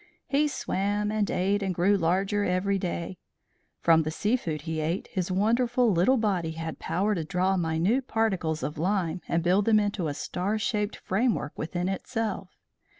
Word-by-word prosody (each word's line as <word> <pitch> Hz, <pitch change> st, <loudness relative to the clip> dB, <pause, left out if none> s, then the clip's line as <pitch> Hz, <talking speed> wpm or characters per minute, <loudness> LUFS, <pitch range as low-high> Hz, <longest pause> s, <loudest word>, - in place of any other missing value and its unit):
He 290 Hz, +2 st, +2 dB
swam 205 Hz, -5 st, -1 dB
and 215 Hz, -1 st, 0 dB
ate, 200 Hz, +3 st, +1 dB
and 190 Hz, -2 st, -1 dB
grew 190 Hz, +4 st, +3 dB
larger 195 Hz, +3 st, +1 dB
every 195 Hz, +1 st, +1 dB
day. 175 Hz, 0 st, -4 dB, 0.6 s
From 165 Hz, -1 st, +5 dB
the 155 Hz, -, -2 dB
sea 210 Hz, +9 st, 0 dB
food 155 Hz, -, -4 dB
he 160 Hz, 0 st, -3 dB
ate 160 Hz, +4 st, -1 dB
his 185 Hz, -1 st, -2 dB
wonderful 235 Hz, +4 st, +2 dB
little 190 Hz, +9 st, +3 dB
body 185 Hz, -8 st, 0 dB
had 160 Hz, 0 st, -5 dB
power 200 Hz, +5 st, 0 dB
to 170 Hz, -5 st, -2 dB
draw 185 Hz, +3 st, +1 dB
minute 180 Hz, +10 st, +1 dB
particles 190 Hz, -8 st, 0 dB
of 150 Hz, 0 st, -4 dB
lime 180 Hz, -1 st, 0 dB
and 170 Hz, 0 st, 0 dB
build 185 Hz, +4 st, +3 dB
them 220 Hz, -1 st, +5 dB
into 205 Hz, -5 st, -1 dB
a 145 Hz, -, -3 dB
star 190 Hz, +8 st, -2 dB
shaped 210 Hz, 0 st, -1 dB
framework 205 Hz, -, -1 dB
within 175 Hz, +3 st, -3 dB
itself. 200 Hz, 0 st, -3 dB
190 Hz, 170 wpm, -27 LUFS, 170-210 Hz, 0.6 s, From